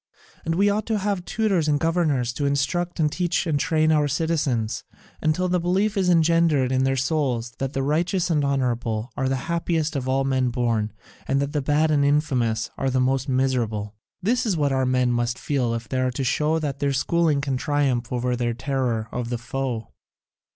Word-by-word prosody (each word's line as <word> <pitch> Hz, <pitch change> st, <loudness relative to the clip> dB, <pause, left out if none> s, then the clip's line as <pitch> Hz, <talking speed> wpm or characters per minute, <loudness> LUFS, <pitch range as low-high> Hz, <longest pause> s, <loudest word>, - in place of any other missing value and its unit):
And 165 Hz, 0 st, -1 dB
then -, -, -3 dB
we 200 Hz, +2 st, +4 dB
ought 205 Hz, +1 st, 0 dB
to 220 Hz, -1 st, +1 dB
have 200 Hz, -3 st, -2 dB
tutors 195 Hz, -8 st, 0 dB
and 145 Hz, -1 st, +2 dB
governors 155 Hz, -8 st, +1 dB
to 140 Hz, +3 st, -1 dB
instruct 170 Hz, +6 st, -1 dB
and 150 Hz, -2 st, +2 dB
teach 180 Hz, +2 st, 0 dB
and 155 Hz, -4 st, 0 dB
train 155 Hz, -1 st, +2 dB
our 150 Hz, -2 st, +3 dB
citizens 145 Hz, -9 st, -1 dB, 0.4 s
until 155 Hz, +4 st, +1 dB
the 180 Hz, 0 st, +1 dB
belief 190 Hz, +5 st, +1 dB
is 190 Hz, -2 st, +1 dB
engendered 165 Hz, -5 st, +3 dB
in 130 Hz, 0 st, +2 dB
their 135 Hz, 0 st, +1 dB
souls 130 Hz, -4 st, -1 dB
that 135 Hz, +1 st, -2 dB
the 135 Hz, -, -1 dB
righteous 175 Hz, +5 st, 0 dB
and 150 Hz, -3 st, +2 dB
the 140 Hz, -, 0 dB
honourable 120 Hz, -4 st, -1 dB
are 130 Hz, 0 st, 0 dB
the 135 Hz, -, +1 dB
happiest 165 Hz, -2 st, -1 dB
of 130 Hz, -2 st, -2 dB
all 135 Hz, +1 st, +2 dB
men 130 Hz, -2 st, +1 dB
born, 115 Hz, -3 st, 0 dB, 0.4 s
and 135 Hz, +1 st, +1 dB
the 145 Hz, +1 st, -1 dB
bad 150 Hz, +3 st, +2 dB
and 145 Hz, -2 st, +3 dB
the -, -, +3 dB
infamous 120 Hz, -6 st, +1 dB
the 130 Hz, -1 st, +1 dB
most 130 Hz, +1 st, +1 dB
miserable. 120 Hz, -6 st, 0 dB, 0.3 s
This 240 Hz, +6 st, +2 dB
is 205 Hz, -7 st, 0 dB
what 145 Hz, -2 st, +1 dB
our 130 Hz, -1 st, +1 dB
men 125 Hz, -1 st, +2 dB
must 120 Hz, 0 st, 0 dB
feel 125 Hz, -5 st, -1 dB
if 115 Hz, -1 st, -5 dB
they 130 Hz, -, -2 dB
are 130 Hz, -, +1 dB
to 125 Hz, +2 st, -3 dB
show 150 Hz, +5 st, +1 dB
that 145 Hz, -4 st, -3 dB
their 140 Hz, -1 st, +1 dB
schooling 155 Hz, +2 st, +2 dB
can 140 Hz, -1 st, -1 dB
triumph 135 Hz, -3 st, 0 dB
over 125 Hz, 0 st, 0 dB
their 120 Hz, -1 st, -1 dB
terror 125 Hz, -4 st, -1 dB
of 120 Hz, -1 st, -3 dB
the 120 Hz, -, -1 dB
foe. 120 Hz, -1 st, -4 dB
140 Hz, 205 wpm, -24 LUFS, 125-160 Hz, 0.4 s, we